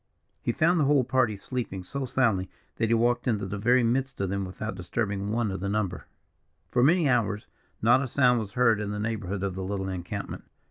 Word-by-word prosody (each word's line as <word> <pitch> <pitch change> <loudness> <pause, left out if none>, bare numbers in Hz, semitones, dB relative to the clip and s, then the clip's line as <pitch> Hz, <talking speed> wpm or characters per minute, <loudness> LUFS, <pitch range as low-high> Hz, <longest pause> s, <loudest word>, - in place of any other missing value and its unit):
He - - 0
found 170 +7 +3
the 150 - +3
whole 140 -1 +4
party 125 -4 +1
sleeping 100 -4 -4
so 135 +9 -4
soundly 115 -8 +1 0.3
that 115 - +1
he 115 - +2
walked 120 +2 +1
into 105 -5 0
the 100 +1 -4
very 120 +4 +4
midst 130 +3 0
of 95 -1 -1
them 100 -1 -1
without 95 +3 -5
disturbing 100 +2 -2
one 110 -1 0
of 95 - -4
the 100 +2 -2
number. 100 -4 -2 0.6
For 120 - +2
many 165 +2 +4
hours, 110 -5 +1 0.4
not 120 +4 +5
a 140 - -2
sound 125 -1 +3
was 105 -3 -6
heard 115 -4 +3
in 105 - -3
the 105 - -3
neighbourhood 105 -3 -3
of 100 -2 -1
the 95 +1 -5
little 95 0 -3
encampment. 95 +2 -5
110 Hz, 215 wpm, -27 LUFS, 100-125 Hz, 0.6 s, not